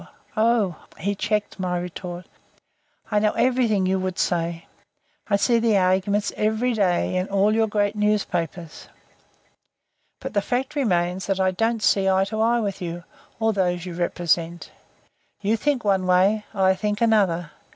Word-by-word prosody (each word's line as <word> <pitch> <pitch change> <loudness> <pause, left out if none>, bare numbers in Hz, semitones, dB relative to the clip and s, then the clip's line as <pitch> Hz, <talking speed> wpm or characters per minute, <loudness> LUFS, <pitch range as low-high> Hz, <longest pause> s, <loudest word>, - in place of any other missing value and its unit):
Oh!" 215 -6 +1
he 200 +4 -1
checked 210 0 -2
my 180 -1 -1
retort 175 0 -6 0.9
"I 210 - +3
know 210 0 +1
everything 240 -6 +2
you 190 +1 +1
would 185 -1 -3
say. 170 -1 -1 0.6
I 205 - +2
see 235 +3 +2
the 225 -3 +3
arguments 190 +2 +1
every 220 +4 0
day 185 -3 +1
in 185 +1 -2
all 200 +2 +2
your 225 0 +2
great 205 0 0
newspapers. 180 -6 -2 1.3
But - - -6
the 205 - +2
fact 255 +6 -2
remains 185 -8 0
that 195 -1 0
I 190 0 +2
don't 225 +3 -1
see 195 -1 +3
eye 190 0 +3
to 220 +1 -2
eye 235 +1 +2
with 200 -3 -3
you, 175 0 -5 0.4
or 225 0 +2
those 180 -3 0
you 180 - -6
represent. 170 -1 -1 0.7
You 210 +2 +1
think 270 +2 0
one 190 -3 +1
way, 195 +4 +3
I 190 -2 +3
think 210 +2 -2
another. 195 -8 +2
195 Hz, 155 wpm, -23 LUFS, 180-215 Hz, 1.3 s, I